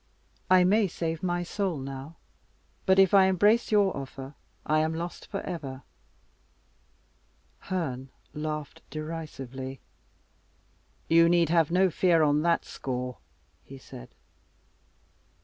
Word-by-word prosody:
I 185 -1 +6
may 205 +3 +3
save 165 -2 -3
my 175 -1 -1
soul 185 -2 -2
now; 135 +3 -7 0.7
but 190 0 +5
if 195 -1 +5
I 195 -1 +7
embrace 205 +6 +3
your 205 -3 +3
offer 135 0 -7 0.3
I 155 0 +2
am 160 +1 0
lost 170 +1 -6
for 195 - -4
ever." 140 -7 -6 1.8
Herne 135 -8 -4 0.2
laughed 150 -1 -5
derisively. 135 -5 -6 1.3
"You 165 0 +5
need 170 -2 +3
have 165 -2 +3
no 185 +1 +3
fear 165 -1 +3
on 150 0 +3
that 170 +1 +1
score," 125 -1 -5 0.4
he 135 - -11
said. - - -12
165 Hz, 115 wpm, -28 LUFS, 135-180 Hz, 1.8 s, I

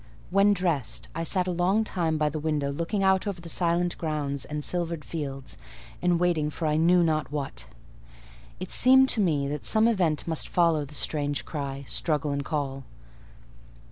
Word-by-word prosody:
When 195 +2 +5
dressed, 160 - -1
I 165 - -3
sat 180 +2 +1
a 185 - -1
long 180 +5 +2
time 165 -6 -1
by 150 0 +1
the 155 +1 -4
window 150 -2 -1
looking 170 +7 -2
out 190 +1 +3
over 195 -3 -3
the 170 -1 -9
silent 175 +1 +1
grounds 145 -4 -2
and 150 0 -5
silvered 170 -2 -2
fields 135 -4 -5 0.4
and 175 -1 +2
waiting 170 -4 +1
for 160 +2 -5
I 150 - +1
knew 170 +3 +4
not 155 -3 0
what. 135 - -4 0.9
It 185 - -6
seemed 265 +1 +6
to 220 - +2
me 150 -7 +1
that 150 0 -4
some 220 +1 +3
event 175 -10 +1
must 160 -2 -1
follow 165 -4 +2
the 150 +2 -13
strange 145 -1 -1
cry, 140 -2 -5
struggle, 150 -2 0
and 140 0 -2
call. 135 -3 -3
160 Hz, 175 wpm, -27 LUFS, 145-180 Hz, 0.9 s, seemed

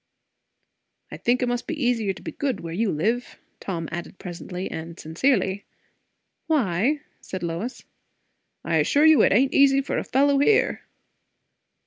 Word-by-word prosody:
"I - - -7
think 250 +1 +1
it - - +1
must 245 0 -2
be 305 - -4
easier 240 -6 +1
to - - -10
be - - -5
good 270 -6 -2
where 165 -1 -6
you 210 +2 0
live," 225 +11 -1 0.2
Tom 170 -4 -4
added 175 +2 -6
presently, 180 +1 -6
and 165 +2 -7
sincerely. 190 - 0 0.8
"Why?" 270 - +1 0.2
said 185 -2 -6
Lois. 170 +9 -4 0.8
"I - - +1
assure 295 +1 +3
you 315 -1 +7
it - - +4
ain't 260 +7 +3
easy 275 -1 +5
for 275 - -2
a - - -3
fellow 280 +1 +2
here." 425 +10 +3
230 Hz, 150 wpm, -24 LUFS, 175-275 Hz, 0.8 s, you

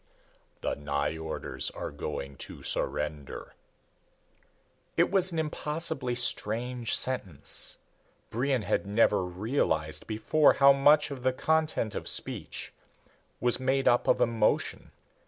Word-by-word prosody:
"The - - -1
Nyjorders 75 +2 -3
are - - -4
going 70 -1 -5
to - - -9
surrender." 75 -2 -3 1.4
It - - +3
was 190 -2 +3
an 165 - -4
impossibly 150 -4 -1
strange 120 0 +1
sentence. 95 - -1 0.5
Brion 130 0 0
had 100 - -1
never 105 -2 +3
realized 90 - -1
before 115 +8 +3
how 140 0 +6
much 145 +2 +4
of 135 -3 -6
the 130 0 +1
content 155 -6 0
of - - -5
speech - - -3 0.7
was 120 +1 +1
made 135 +1 +1
up 120 - +3
of - - +4
emotion. 115 -2 +1
120 Hz, 115 wpm, -29 LUFS, 90-140 Hz, 1.4 s, how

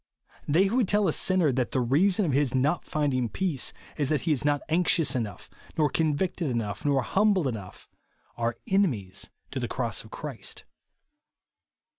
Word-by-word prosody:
They 160 +6 +4
who 210 +6 0
would 240 -6 +3
tell 205 0 +3
a 160 - +2
sinner 185 -6 +3
that 125 -1 -1
the - - +2
reason 180 - +3
of 155 - 0
his 135 -1 +1
not 145 +6 +1
finding 135 -6 0
peace 165 - -1 0.3
is 145 -3 0
that 150 -4 +1
he 165 - 0
is 145 - +1
not 145 -1 +1
anxious 165 -4 +2
enough, 110 -7 -4 0.3
nor 150 -3 +2
convicted 160 +1 0
enough, 115 -5 -3
nor 140 -3 +2
humbled 200 - +2
enough, 105 -7 -7 0.5
are 115 0 -2
enemies 125 - 0 0.2
to - - -3
the - - -2
cross - - -2
of - - -14
Christ. - - -8
145 Hz, 170 wpm, -27 LUFS, 125-180 Hz, 0.5 s, They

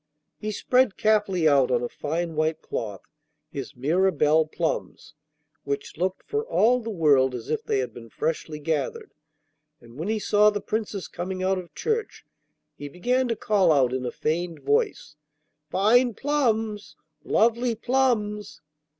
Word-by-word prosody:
He 215 - -4
spread 250 +1 +2
carefully 205 -6 +2
out 140 -3 +4
on 125 -1 +1
a - - -1
fine 165 +6 -3
white 155 +1 0
cloth 105 -4 -5 0.5
his 140 +1 -6
Mirabelle 155 +2 +2
plums, 165 +1 -3 0.5
which 140 0 -4
looked 185 +3 -2
for 435 0 -1
all 250 - +3
the 230 -1 -6
world 140 - +3
as 120 +3 -6
if 155 - -1
they - - 0
had 125 -3 -2
been 115 -1 -11
freshly 155 +3 -3
gathered, 160 - -3 0.7
and 120 +3 -15
when 165 - -3
he 220 +1 0
saw 210 0 +4
the 205 -1 -2
Princess 210 -4 -3
coming 185 +1 -5
out 190 0 +1
of 175 -2 -11
church 450 -1 -2 0.5
he 145 - -8
began 250 - 0
to 230 - -1
call 205 -5 +2
out 130 -4 +3
in 130 0 -2
a 125 - -3
feigned 165 0 -2
voice: 145 +2 0 0.5
'Fine 230 - +3
plums! 225 -8 -1 0.3
lovely 235 +1 +2
plums! 225 -5 0
185 Hz, 150 wpm, -25 LUFS, 145-220 Hz, 0.7 s, out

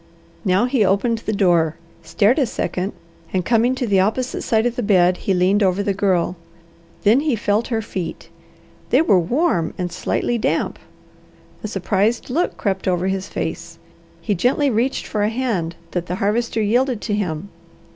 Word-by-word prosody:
Now 190 +2 +2
he 250 -3 +2
opened 200 +4 +1
the 220 - -3
door, 175 -6 +2 0.3
stared 200 - +2
a 265 - +2
second, 190 -2 -3 0.4
and 185 -2 -1
coming 240 +2 +2
to 255 - -2
the 200 -4 +2
opposite 225 +7 0
side 220 0 +1
of 245 -1 0
the 245 - -2
bed, 185 -4 +3
he 195 - -1
leaned 185 +3 +3
over 195 0 +2
the 200 - 0
Girl. 185 -3 +1 0.7
Then 220 +5 +5
he 295 -3 +1
felt 210 +1 0
her 225 -2 -1
feet. 180 -5 -5 0.6
They - - +4
were 200 - +4
warm 205 - 0
and 180 -1 -3
slightly 240 +6 -1
damp. - - -1 0.8
A - - -2
surprised 205 +4 0
look 335 +7 0
crept 190 -3 -2
over 180 +1 +1
his 190 0 -2
face. - - -5 0.4
He 210 - 0
gently 260 - +2
reached 240 +4 0
for 210 - -2
a 205 - +2
hand 220 -9 -2 0.2
that 175 -1 -3
the 180 - -2
Harvester 220 +3 0
yielded 245 +3 +1
to 210 - -2
him. 190 -3 -2
205 Hz, 175 wpm, -20 LUFS, 185-235 Hz, 0.8 s, Then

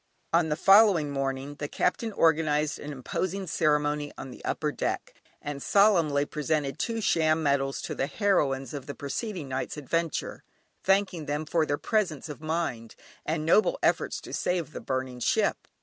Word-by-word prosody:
On 165 -1 +3
the 150 - +1
following 195 -6 +5
morning 135 +1 -3
the 145 - -2
Captain 220 +9 -1
organised 155 -3 +2
an 150 - -6
imposing 185 +8 -3
ceremony 150 -3 +1
on 135 - -7
the - - -12
upper - - -1
deck, - - -3 0.3
and 145 -1 -6
solemnly 170 -9 +4
presented 150 -2 -2
two 230 -1 -1
sham 160 -4 +2
medals 135 -1 0
to - - -3
the 135 - -1
heroines 140 - 0
of 140 -2 -6
the 145 - -6
preceding 170 - -4
night's 130 +3 -3
adventure, 165 +3 -2 0.4
thanking 190 -5 +1
them 145 +2 -2
for 160 0 +1
their 145 - 0
presence 180 -8 -1
of 150 -1 -8
mind, 155 -8 -3 0.3
and 155 0 -1
noble 215 - +4
efforts - - +1
to - - -10
save 175 -4 -1
the - - -7
burning 130 -1 -3
ship! - - +1
150 Hz, 165 wpm, -28 LUFS, 140-170 Hz, 0.4 s, following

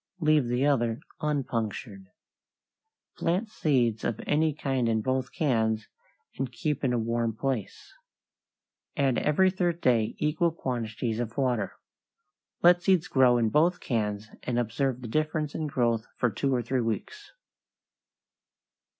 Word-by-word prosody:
Leave 155 -5 +3
the 125 +3 +1
other 120 -5 +1 0.2
unpunctured. 115 -8 -3 1.1
Plant 185 +7 0
seeds 125 - +1
of 115 - -1
any 155 +1 +2
kind 135 -5 -1
in 110 -1 +2
both 130 +2 -1
cans 110 -7 0 0.5
and 135 -2 -2
keep 145 +5 -2
in 130 - +2
a 120 - +1
warm 115 0 -1
place. 130 -7 -3 1.0
Add 135 -3 +2
every 185 +5 +3
third 175 -2 -1
day 115 -7 +2
equal 155 +3 +1
quantities 115 -5 -3
of 120 0 -4
water. 125 -7 0 0.9
Let 175 0 +6
seeds 185 -2 +3
grow 125 -2 +4
in 115 -2 +2
both 165 +7 +3
cans 105 -3 -2
and 125 -1 -2
observe 120 +2 -1
the - - -5
difference 155 +3 -1
in 155 - -2
growth 115 -5 0
for 125 - +1
two 135 +7 -1
or 120 - 0
three 125 +2 0
weeks. 400 - -4
125 Hz, 135 wpm, -28 LUFS, 115-150 Hz, 1.1 s, Let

